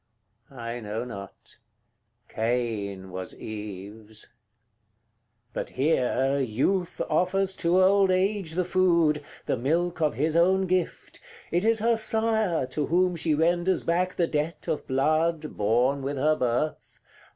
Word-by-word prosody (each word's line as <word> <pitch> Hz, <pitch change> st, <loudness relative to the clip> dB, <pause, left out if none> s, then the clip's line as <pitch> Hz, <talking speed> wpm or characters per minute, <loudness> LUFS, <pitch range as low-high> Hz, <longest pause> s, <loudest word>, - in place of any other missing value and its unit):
I 120 Hz, -2 st, -6 dB
know 110 Hz, +2 st, -4 dB
not 100 Hz, -5 st, -10 dB, 0.7 s
Cain 110 Hz, -5 st, -2 dB
was 95 Hz, 0 st, -6 dB
Eve's. 105 Hz, +1 st, -8 dB
CL. -, -, -18 dB, 1.2 s
But -, -, -4 dB
here 135 Hz, -1 st, +1 dB
youth 140 Hz, -, 0 dB
offers 190 Hz, +1 st, +1 dB
to 175 Hz, +2 st, +2 dB
old 195 Hz, 0 st, +4 dB
age 185 Hz, -2 st, 0 dB
the 180 Hz, +1 st, 0 dB
food, 170 Hz, -5 st, +2 dB, 0.2 s
The -, -, 0 dB
milk 165 Hz, +7 st, 0 dB
of 150 Hz, -6 st, +1 dB
his 155 Hz, +5 st, 0 dB
own 190 Hz, +3 st, +4 dB
gift: 185 Hz, -1 st, -2 dB, 0.3 s
it 175 Hz, +2 st, +1 dB
is 225 Hz, +1 st, +3 dB
her 230 Hz, +2 st, +2 dB
sire 220 Hz, -, +1 dB
To 140 Hz, +3 st, -3 dB
whom 180 Hz, +2 st, +2 dB
she 160 Hz, -2 st, +1 dB
renders 175 Hz, +4 st, +1 dB
back 180 Hz, +2 st, 0 dB
the 175 Hz, -, +2 dB
debt 155 Hz, +2 st, -3 dB
of 160 Hz, -3 st, -2 dB
blood 155 Hz, +3 st, 0 dB
Born 120 Hz, +7 st, +2 dB
with 140 Hz, +1 st, -3 dB
her 155 Hz, +3 st, +3 dB
birth. 125 Hz, +4 st, -2 dB
155 Hz, 135 wpm, -26 LUFS, 125-180 Hz, 1.2 s, old